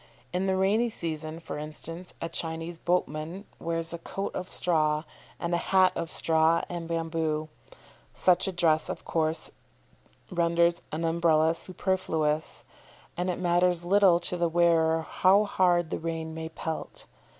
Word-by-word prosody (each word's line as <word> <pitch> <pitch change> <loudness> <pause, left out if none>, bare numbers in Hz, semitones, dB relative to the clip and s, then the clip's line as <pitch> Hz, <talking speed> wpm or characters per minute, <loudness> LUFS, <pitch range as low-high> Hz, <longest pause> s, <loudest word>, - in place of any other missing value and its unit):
In 185 +2 0
the 190 - +2
rainy 210 +5 +2
season, 160 -4 -4
for 165 - -6
instance, 165 +4 -8
a - - -1
Chinese 165 0 -4
boatman 175 +2 -1
wears 165 0 -2
a 170 - -5
coat 195 +4 -4
of 185 - -5
straw, 155 -3 +1 0.4
and 170 0 -2
a - - +3
hat 185 0 +4
of 165 - -3
straw 160 0 +3
and 170 -1 -5
bamboo. 160 -2 -1 0.7
Such 180 +1 +3
a - - 0
dress, 165 -3 +2
of - - -5
course, 160 0 -1 0.8
renders 170 0 +2
an 160 +2 -2
Umbrella 165 -1 +3
superfluous, 165 -4 -1 0.5
and 180 +1 -1
it 180 - -1
matters 175 -1 +2
little 190 -2 +5
to 180 - 0
the 170 -1 +1
wearer 165 -1 +3
how 195 +5 +4
hard 175 -4 +2
the - - -2
rain 160 -1 -4
may 160 0 -5
pelt. 160 0 -5
170 Hz, 150 wpm, -28 LUFS, 160-180 Hz, 0.8 s, little